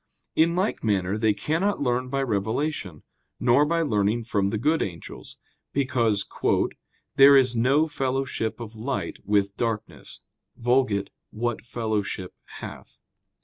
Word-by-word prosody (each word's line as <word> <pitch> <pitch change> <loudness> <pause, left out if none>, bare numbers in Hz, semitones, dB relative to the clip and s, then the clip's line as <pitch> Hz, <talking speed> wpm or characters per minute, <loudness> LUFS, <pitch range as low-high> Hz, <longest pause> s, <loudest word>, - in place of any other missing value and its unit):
In 165 +2 +3
like 190 +4 -1
manner 100 -3 +1
they 110 -1 +2
cannot 165 - 0
learn 125 -1 0
by 135 +1 0
revelation, 110 - -2 0.4
nor 140 +5 +4
by 165 +1 +1
learning 110 -3 +1
from 100 -3 0
the 110 - -1
good 155 +8 +1
angels: 85 -4 -7 0.4
because 120 -7 +1 0.9
"there 140 0 +9
is 130 -2 +3
no 135 +7 +3
fellowship 135 -5 -2
of 115 -1 -8
light 110 -6 -3
with 100 -1 +1
darkness 115 -2 -4 0.4
[*Vulg.: 120 -5 +1 0.2
'What 120 +1 -2
fellowship 110 -5 -3 0.2
hath - - -10
120 Hz, 125 wpm, -25 LUFS, 105-135 Hz, 0.9 s, there